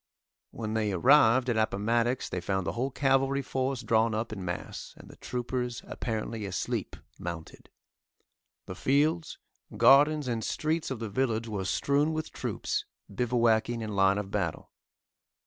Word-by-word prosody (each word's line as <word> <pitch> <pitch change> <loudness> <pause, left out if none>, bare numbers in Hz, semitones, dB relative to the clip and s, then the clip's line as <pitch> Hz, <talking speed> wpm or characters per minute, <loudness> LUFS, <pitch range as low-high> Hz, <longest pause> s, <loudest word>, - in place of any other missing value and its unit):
When 110 -2 -5
they 110 -2 0
arrived 125 - +5
at 120 -3 +1
Appomattox 115 +3 +1
they 90 - -3
found 95 +1 -1
the 80 - -1
whole 125 +9 -2
cavalry 135 0 +1
force 130 -1 -2
drawn 110 0 +2
up 110 0 -3
in 95 -3 -6
mass, 90 -1 -6
and - - -14
the - - -14
troopers 125 0 -3
apparently 110 -1 -4
asleep 95 - -3 0.2
mounted. 85 -2 -7 1.0
The - - -6
fields, 150 - +1 0.4
gardens 145 +1 +5
and 115 -2 -2
streets 155 +6 -1
of 130 - -3
the 110 -1 -5
village 115 -1 0
were 100 -3 -3
strewn 145 +9 +1
with 155 0 -4
troops, - - -3 0.3
bivouacing 115 0 +1
in 105 -2 -4
line 95 0 +4
of 100 -1 -4
battle. - - -3
115 Hz, 145 wpm, -29 LUFS, 105-135 Hz, 1.0 s, arrived